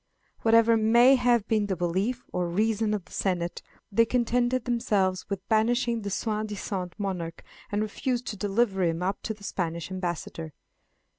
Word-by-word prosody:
Whatever 230 0 +5
may 235 +4 +6
have 245 -4 +3
been 215 -3 +1
the 190 - -1
belief 190 +8 -1
or 180 -1 0
reason 215 +4 +1
of 195 -4 -5
the - - -21
senate, 175 -3 -1 0.3
they 230 +3 +5
contented 245 +1 +1
themselves 200 -6 0
with 200 -1 -4
banishing 235 +1 +2
the 200 - -4
soi 215 +2 -1
disant 195 -4 -4
monarch, 180 -5 -4 0.3
and 205 +1 +1
refused 245 +3 -2
to 215 - -4
deliver 200 0 0
him 170 0 0
up 195 +2 -1
to 220 - -4
the 205 - -18
Spanish 170 -2 -3
ambassador. 170 -3 -4
210 Hz, 160 wpm, -27 LUFS, 185-230 Hz, 0.3 s, may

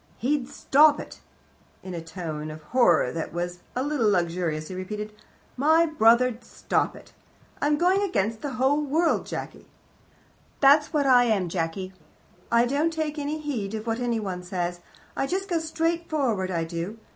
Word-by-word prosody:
"He'd 265 +1 -1
stop 295 +2 +4
it." - - -9 0.6
In 185 - -7
a 170 - -4
tone 160 -3 -6
of 155 0 -9
horror, 170 - +3
that 165 +2 -4
was 175 +1 -4 0.2
a 255 - 0
little 280 -7 +1
luxurious, 170 -4 -1
he - - -6
repeated: 210 +3 -5 0.4
"My 315 +5 +4
brother'd 245 -5 +3
stop - - -1
it. - - -15 0.5
I'm 295 +1 +2
going 370 +4 +3
against 225 - -1
the 285 -2 -4
whole 265 +4 +2
world, 315 +4 +1
Jacky. - - -7 0.9
"That's 295 +2 +5
what 295 -3 +1
I 250 -2 +6
am, 200 -6 +1
Jacky. 180 +2 -3 0.6
I 235 +1 +4
don't 290 +6 +1
take 310 -1 -3
any 295 +2 -3
heed 230 -9 -3
of 215 0 -5
what 225 0 -1
anyone 220 -7 -2
says. 175 -1 -3 0.4
I 270 - -1
just 385 +4 -2
go 345 -4 0
straight 330 +1 -2
forward, 235 -12 0
I 170 -3 -1
do. 170 +6 -5
235 Hz, 165 wpm, -25 LUFS, 180-295 Hz, 0.9 s, I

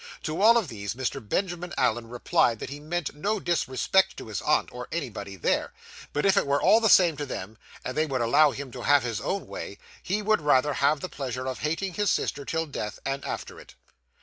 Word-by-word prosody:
To 155 +4 -3
all 230 +3 +7
of 225 - 0
these, 105 -3 -5
Mr. 130 0 -3
Benjamin 180 - -2
Allen 120 -2 +1
replied 120 -1 +1
that - - -7
he 145 - -6
meant 170 +2 -3
no 200 +9 -1
disrespect 175 +2 +1
to - - -8
his 105 -6 -3
aunt, - - +2
or 125 0 -7
anybody 110 -11 -5
there, 90 - 0 0.4
but 145 - -1
if 195 - +5
it - - +2
were 140 +1 +2
all 220 - +5
the 220 - +3
same 175 -5 +6
to 145 - -3
them, 110 -2 -6 0.3
and 125 - -4
they 155 +1 +1
would 135 -3 -1
allow 130 +6 +5
him 140 -1 -6
to - - -8
have 145 -2 +4
his 115 -3 -3
own 195 - -2
way, - - -7 0.2
he 210 +3 -2
would 215 -2 +2
rather 145 0 +3
have 140 +2 +2
the - - -3
pleasure 130 -2 -4
of 130 - -4
hating 165 +5 -2
his 205 +3 0
sister 140 -1 -1
till 165 +2 -1
death, 105 -8 -5
and 135 +1 -2
after - - -5
it. - - -15
145 Hz, 225 wpm, -27 LUFS, 125-175 Hz, 0.4 s, all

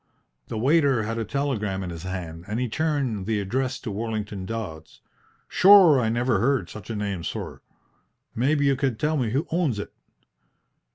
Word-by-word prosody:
The 110 - -5
waiter 135 -1 +3
had 115 +2 -3
a - - -1
telegram 105 -6 -2
in 90 - -5
his 85 -1 -7
hand, 90 -3 -6
and 105 +3 -2
he 125 - 0
turned 130 -7 -1
the 110 -2 +1
address 130 +6 -1
to 110 - -5
Worlington 105 -2 -4
Dodds. 95 -9 -6 0.5
"Shure 185 -7 +7
I 115 -3 +1
niver 120 -2 +1
heard 120 -5 +1
such 110 -1 -10
a 115 - -3
name, 100 -4 -3
sorr. - - -5 0.7
Maybe 145 +5 +1
you 140 -1 +3
could 130 -4 -1
tell 155 +1 +1
me 125 -6 0
who 135 +8 0
owns 160 -9 +1
it?" 105 - -6
115 Hz, 175 wpm, -25 LUFS, 100-140 Hz, 0.7 s, Shure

